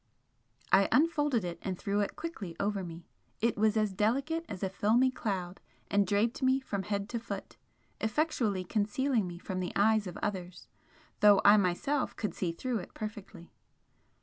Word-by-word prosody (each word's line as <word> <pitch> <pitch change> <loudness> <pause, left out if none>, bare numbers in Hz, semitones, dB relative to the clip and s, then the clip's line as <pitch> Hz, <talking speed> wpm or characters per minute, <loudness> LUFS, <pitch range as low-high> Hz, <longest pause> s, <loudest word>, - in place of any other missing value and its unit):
I 195 0 +6
unfolded 295 - +3
it 175 -1 -5
and 185 -2 -3
threw 200 +2 -1
it 205 - -1
quickly 215 - -6
over 200 -1 -1
me 170 -1 -8 0.3
it 235 +1 +1
was 215 +1 +2
as 215 -2 +1
delicate 275 - 0
as 185 - -6
a 190 - 0
filmy 230 +6 +3
cloud 190 -7 -3 0.3
and 200 -1 +3
draped 210 +7 +1
me 260 0 +3
from 205 -7 -3
head 200 +1 -2
to 235 - -2
foot, 230 - -7 0.4
effectually 220 - 0
concealing 215 +3 0
me 175 -1 -7
from 185 +1 -4
the 180 - -3
eyes 215 0 +3
of 180 - -7
others 185 -3 -4 0.5
though 205 -2 +7
I 205 - +9
myself 205 +9 0
could 210 - -3
see 175 -3 -2
through 235 +7 -2
it 180 - -10
perfectly. 210 -5 -8
210 Hz, 170 wpm, -31 LUFS, 190-235 Hz, 0.5 s, I